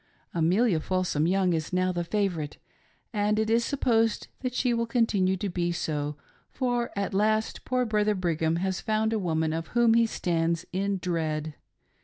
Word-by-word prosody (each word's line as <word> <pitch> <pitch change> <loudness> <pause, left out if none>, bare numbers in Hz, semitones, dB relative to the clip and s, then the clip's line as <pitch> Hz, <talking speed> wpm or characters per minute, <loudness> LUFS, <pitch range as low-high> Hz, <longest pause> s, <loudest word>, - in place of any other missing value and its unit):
] - - -40
Amelia 185 +2 +3
Folsorji 175 -2 0
Young 185 -1 +2
is 160 -2 -2
now 185 0 +1
the 175 -1 -2
favorite, 170 -5 -2 0.6
and 210 0 +1
it 220 0 +1
is 230 +1 +3
sup 280 +3 -3
posed 225 -2 +2
that 255 -1 -3
she 250 -1 +2
will 230 0 0
continue 205 -6 +2
to 200 - -3
be 175 -1 -1
so, 150 -3 -2 0.3
for 245 -2 -1
at 200 -1 -2
last 215 +2 +1
poor 255 -1 +1
Brother 210 -1 +1
Brigham 165 -3 0
has 190 +2 -1
found 220 0 0
a 220 - +1
woman 160 -4 0
of 165 0 -3
whom 235 -1 +5
he 230 0 +4
stands 170 -3 -1
in 195 +1 0
dread. 160 -4 -2
190 Hz, 180 wpm, -27 LUFS, 170-220 Hz, 0.6 s, whom